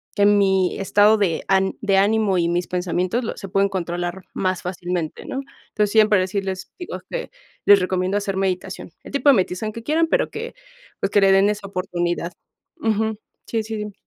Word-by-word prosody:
que 200 - +3
mi 195 -3 +3
estado 205 +2 +4
de 185 -6 0
án 190 0 +2
de 200 -2 +2
ánimo 205 -1 +3
y 170 -1 +2
mis 175 +1 -1
pensamientos, 180 +5 -1
lo - - -4
se 195 - -8
pueden 195 +1 +2
controlar 175 -1 -3
más 185 -2 -1
fácilmente, 175 -2 -4
¿no? 270 - -4 0.3
Entonces, 210 -1 0
siempre 215 -2 +5
decirles 190 0 -3
digo 355 - -6
que - - -4 0.4
les 205 -1 +8
recomiendo 185 +1 0
hacer 200 -2 -2
meditación. 190 -2 -3
El - - -11
tipo 280 +1 -1
de 275 - +7
meditación 190 +2 -1
que 230 - -8
quieran, 320 +5 +2
pero - - +1
que 465 +2 -6 0.5
pues, - - +1
que 205 - +4
le 195 0 +5
den 195 +1 +5
esa 210 -1 -3
oportunidad. 175 -2 -2 0.5
Ujú. 220 -1 0 0.3
Sí, 225 -1 -1
sí, 220 +1 -5
dime. 210 -1 -5
195 Hz, 190 wpm, -22 LUFS, 185-215 Hz, 0.5 s, les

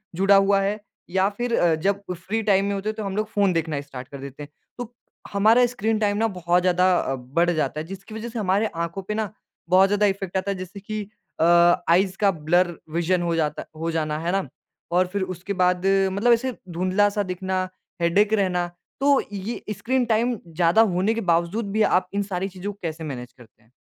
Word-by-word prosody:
जुड़ा 195 +3 +4
हुआ 195 0 +4
है। 200 +2 -1 0.3
या 190 +2 +2
फिर 240 -1 0
अ, 170 -2 +3
जब 195 +5 0
फ्री 190 +6 -3
टाइम 200 -2 +3
में 200 - -1
होते 200 +2 -2
हैं 215 - -3
तो 215 - -5
हम 195 -1 -4
लोग 215 +1 -1
फ़ोन 200 -3 +2
देखना 160 -3 -1
स्टार्ट 130 -3 -9
कर 140 - -9
देते 140 +1 -8
हैं, 145 - -11 0.3
तो 245 -1 -7 0.4
हमारा 220 +5 +5
स्क्रीन 225 -3 -1
टाइम 205 -1 +1
ना 225 +1 +2
बहुत 175 +1 +2
ज़्यादा 180 0 +3
अ, 135 - -1
बढ़ 140 +8 0
जाता 155 -2 -1
है। 155 - -4
जिसकी 195 +3 -9
वजह 225 +2 -5
से 230 - -5
हमारे 200 +2 +1 0.2
आँखों 170 +4 -6
पे 195 +3 -4
ना 215 -1 -2 0.4
बहुत 190 +2 +5
ज़्यादा 205 +1 +2
इफेक्ट 195 -2 -1
आता 190 +1 -1
है, 195 - -3
जैसे 185 +2 -8
कि 215 +2 -5 0.4
अ, 160 - +4 0.4
आइज़ 185 +2 +3
का 200 -1 +5 0.2
ब्लर 175 0 +3 0.2
विजन 175 +1 +1
हो 170 -1 0
जाता 155 -2 -1
हो 165 +1 -2
जाना 155 -1 -1
है 175 - +1
ना? 195 0 -1 0.4
और 180 +1 +3
फिर 200 - -1
उसके 190 +4 -5
बाद 180 0 +2 0.3
मतलब 215 +5 +3
ऐसे 255 +2 0 0.2
धुंधला 185 +4 +2
सा 205 - +1
दिखना, 185 0 -2 0.3
हेडेक 200 +6 +3
रहना, 185 -4 +1 0.3
तो 280 0 +4
ये 205 +4 -4 0.2
स्क्रीन 250 +5 0
टाइम 235 +2 +2
ज़्यादा 170 +5 +3
होने 190 +5 +2
के 230 - -2
बावजूद 180 +6 0
भी 215 +2 0 0.2
आप 185 0 -2
इन 200 0 0
सारी 185 +1 -1
चीज़ों 190 +2 -6
को 200 - -27
कैसे 160 -1 -4
मैनेज 125 -5 -6
करते 120 -2 -20
हैं? 110 - -30
190 Hz, 215 wpm, -24 LUFS, 175-210 Hz, 0.4 s, हमारा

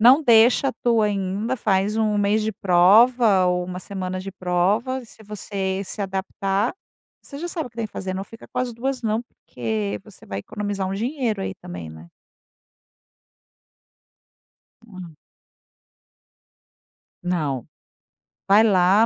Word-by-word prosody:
não 255 +7 +7
deixa 240 +1 +5
a - - -2
tua 230 -3 +3
ainda. 200 +4 -1
Faz 205 -1 +1
1, 215 -1 +2
mês 205 +1 +2
de 220 - 0
prova 200 +3 +5
ou 180 0 +1
1, 180 0 -6
semana 185 -1 -4
de 195 +1 -6
prova. 200 +8 0
Se 220 -1 -16
você 195 -2 -3
se 195 - -6
adaptar, 195 - -1 0.5
você 280 - -10
já 340 - -4
sabe 335 -3 -3
o - - -11
que 225 - -29
tem 230 -2 -2
que - - -24
fazer. 185 -1 -4
Não 195 +1 -4
fica 225 +2 -14
com - - -5
as 250 -1 -1
2, 255 +2 -3
não, 220 0 0
porque 110 - -4
você - - -15
vai 100 - -5
economizar 200 - -3
um 190 - -3
dinheiro 230 -2 -1
aí 190 - -4
também, 85 - -8
né. 80 +2 -12 2.8
Hã. 185 -7 -11 2.1
Não, 150 -8 -1 0.8
vai 205 +3 +6
lá, 195 0 +5
200 Hz, 145 wpm, -23 LUFS, 185-225 Hz, 2.8 s, não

